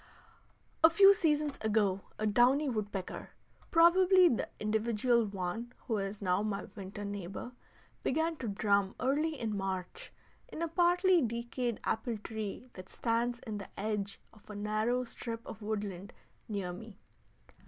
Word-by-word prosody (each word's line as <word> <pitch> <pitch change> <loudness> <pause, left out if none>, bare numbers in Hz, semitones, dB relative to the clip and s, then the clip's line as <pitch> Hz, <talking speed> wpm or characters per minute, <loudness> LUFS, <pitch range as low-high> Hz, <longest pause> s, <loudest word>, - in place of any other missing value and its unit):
A 320 - +10
few 390 +4 +8
seasons 300 -5 0
ago 210 -3 +1 0.2
a 215 - -1
downy 245 +7 +4
woodpecker, 210 -6 -4 0.4
probably 365 +2 +6
the 235 - -1
individual 220 +2 +1
one 200 +5 -4
who 225 - 0
is 195 +1 -4
now 180 +1 +2
my 210 -2 -2
winter 205 0 -7
neighbor, 200 +3 -6 0.5
began 320 +4 0
to 245 - -5
drum 200 -1 +1
early 295 +3 0
in 220 -3 -2
March 195 - -4 0.4
in 330 - -5
a - - 0
partly 355 +2 +4
decayed 235 0 -2
apple 225 0 -1
tree 220 +2 -6
that 185 0 -10
stands 235 +1 0
in 215 -3 -4
the 200 - -8
edge 205 -1 -2
of 215 - -20
a 210 - -7
narrow 215 +4 0
strip 230 -1 -6
of 220 - -9
woodland 205 -3 -4 0.4
near 195 -4 -3
me. 210 +2 -10
220 Hz, 145 wpm, -32 LUFS, 200-260 Hz, 0.5 s, A